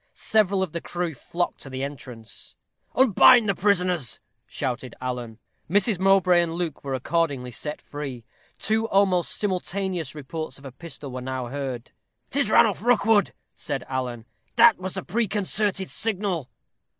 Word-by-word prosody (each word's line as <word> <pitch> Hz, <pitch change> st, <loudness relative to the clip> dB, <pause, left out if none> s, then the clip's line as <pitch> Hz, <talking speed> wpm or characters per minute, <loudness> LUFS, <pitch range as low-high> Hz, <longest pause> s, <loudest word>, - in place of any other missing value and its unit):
Several 200 Hz, -3 st, +2 dB
of 185 Hz, -, -4 dB
the 170 Hz, -, -3 dB
crew 175 Hz, -2 st, -3 dB
flocked 175 Hz, +6 st, -3 dB
to 135 Hz, -, -8 dB
the 130 Hz, 0 st, -4 dB
entrance. 125 Hz, -5 st, -7 dB, 0.4 s
"Unbind 245 Hz, -1 st, +6 dB
the 200 Hz, -, +3 dB
prisoners," 180 Hz, -, +1 dB, 0.3 s
shouted 130 Hz, -1 st, -4 dB
Alan. 125 Hz, -3 st, -4 dB, 0.3 s
Mrs. 200 Hz, +1 st, +3 dB
Mowbray 190 Hz, -2 st, +5 dB
and 165 Hz, -1 st, -2 dB
Luke 170 Hz, -4 st, -3 dB
were 135 Hz, -1 st, -2 dB
accordingly 135 Hz, -2 st, -1 dB
set 150 Hz, +5 st, -5 dB
free. 135 Hz, -5 st, -7 dB, 0.3 s
Two 220 Hz, +2 st, 0 dB
almost 190 Hz, -4 st, +2 dB
simultaneous 185 Hz, -5 st, -2 dB
reports 150 Hz, -1 st, -6 dB
of 140 Hz, -, -15 dB
a 135 Hz, -, -7 dB
pistol 140 Hz, -1 st, -8 dB
were 130 Hz, 0 st, -5 dB
now 130 Hz, -1 st, -4 dB
heard. 130 Hz, -3 st, -5 dB, 0.4 s
"'Tis -, -, +1 dB
Ranulph -, -, +4 dB
Rookwood," 225 Hz, -3 st, +3 dB, 0.2 s
said 140 Hz, -5 st, -4 dB
Alan; 125 Hz, -3 st, -3 dB, 0.3 s
"that 235 Hz, -3 st, +7 dB
was 185 Hz, 0 st, -4 dB
the 190 Hz, -, -3 dB
preconcerted 205 Hz, -2 st, 0 dB
signal." 195 Hz, -, -1 dB
170 Hz, 145 wpm, -25 LUFS, 130-195 Hz, 0.4 s, that